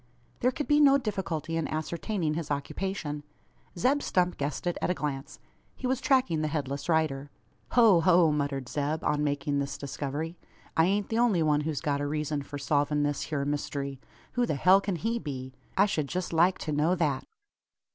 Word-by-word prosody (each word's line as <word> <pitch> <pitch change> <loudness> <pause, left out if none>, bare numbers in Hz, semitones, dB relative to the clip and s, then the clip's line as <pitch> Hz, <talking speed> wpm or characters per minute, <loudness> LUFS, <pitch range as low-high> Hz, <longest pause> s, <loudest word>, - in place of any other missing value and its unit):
There 250 - +3
could 295 +3 -4
be 295 0 +4
no 280 -2 +7
difficulty 185 - -3
in 165 - -1
ascertaining 165 +2 -2
his 160 -1 -4
occupation. 150 +1 -3 0.6
Zeb 270 +10 +2
Stump 180 -6 +1
guessed 140 +2 -3
it 175 - 0
at - - 0
a 180 - +1
glance. 140 -2 -4 0.4
He - - -7
was 260 0 0
tracking 260 - +2
the 155 - 0
headless 145 0 -3
rider. 150 -4 +1 0.4
"Ho, 225 -7 +6
ho!" 170 -1 +5
muttered 140 -3 -1
Zeb, 150 +4 -2
on 150 0 +1
making 145 0 0
this 140 0 -3
discovery; 145 +4 -4 0.4
"I 160 - +5
ain't 200 +2 0
the 225 - 0
only 215 -9 +3
one 150 -1 +3
who's 150 -1 -2
got 145 -1 0
a 145 - -1
reezun 150 0 -1
for 145 - -7
solvin' 145 +1 +1
this 145 -1 -1
hyur 140 -3 -1
myst'ry! 140 -1 -3 0.3
Who 245 -1 +1
the - - 0
hell 185 +7 +5
kin 195 -2 -2
he 225 +7 -1
be? 130 - -6 0.2
I 195 - +6
shed 155 -8 -1
jest 180 +3 -3
like 175 +3 +4
to 155 - -4
know 150 +5 +2
that." 150 -6 0
155 Hz, 190 wpm, -28 LUFS, 145-185 Hz, 0.6 s, no